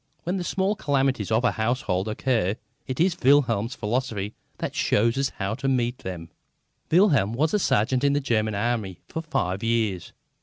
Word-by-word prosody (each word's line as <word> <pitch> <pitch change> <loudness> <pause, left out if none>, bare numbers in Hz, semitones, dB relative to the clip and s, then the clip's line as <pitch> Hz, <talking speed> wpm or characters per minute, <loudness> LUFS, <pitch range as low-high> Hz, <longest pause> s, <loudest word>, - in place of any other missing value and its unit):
When 180 +3 -1
the 180 - -2
small 195 +3 0
calamities 135 - 0
of 110 +2 +2
a 120 - +3
household 110 -4 -1
occur, 110 -3 0 0.3
it 130 - -4
is 175 +1 +2
Wilhelm's 125 -4 +3
philosophy 110 -3 -2 0.2
that - - -4
shows 115 +3 +2
us 135 0 0
how 100 +2 -2
to 135 +4 -3
meet 125 -2 0
them. 85 -3 -7 0.6
Wilhelm 155 - +4
was 150 +6 +1
a 210 - +3
sergeant 125 - +1
in 140 0 +3
the 145 - +2
German 110 -6 0
Army 105 -3 -1
for 160 - -4
five 95 - -2
years. 110 -6 -1
120 Hz, 175 wpm, -25 LUFS, 105-140 Hz, 0.6 s, Wilhelm